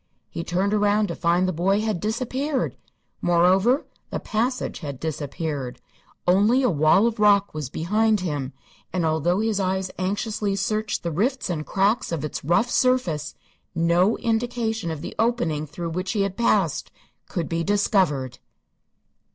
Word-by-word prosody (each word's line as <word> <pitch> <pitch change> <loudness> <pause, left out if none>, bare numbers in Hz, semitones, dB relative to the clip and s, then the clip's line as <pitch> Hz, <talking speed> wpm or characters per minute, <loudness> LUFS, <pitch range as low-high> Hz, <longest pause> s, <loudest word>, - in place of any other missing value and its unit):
He 165 - -4
turned 190 +4 0
around 210 0 +2
to - - -3
find 175 +2 +2
the 185 - -1
boy 195 +5 +1
had 215 -5 -1
disappeared. 255 - -2 0.5
Moreover, 185 - +3 0.2
the - - -3
passage 240 +4 -2
had 140 -5 -6
disappeared. 145 -3 -4 0.5
Only 210 +9 +4
a 250 - +3
wall 155 +6 +4
of 230 -1 -1
rock 205 -1 +4
was 150 -4 -4
behind 210 +7 +1
him, 145 -7 -3 0.4
and 180 -3 0
although 160 +5 +1
his 220 -2 0
eyes 190 0 -1
anxiously 205 +2 -1
searched 215 +2 -1
the 170 - -2
rifts 230 - 0
and 155 -3 -4
cracks 200 +3 +1
of 155 -3 -2
its 150 - -5
rough 175 - +2
surface, 185 - +1 0.4
no 170 +5 +3
indication 225 -4 -1
of 160 -3 -4
the - - -6
opening 170 -10 0
through 165 +3 -5
which 185 +4 -2
he 205 -3 +1
had 195 -1 -2
passed 200 -8 +1 0.4
could 170 -3 -2
be 165 0 -1
discovered. 185 - +1
190 Hz, 150 wpm, -24 LUFS, 165-220 Hz, 0.5 s, Only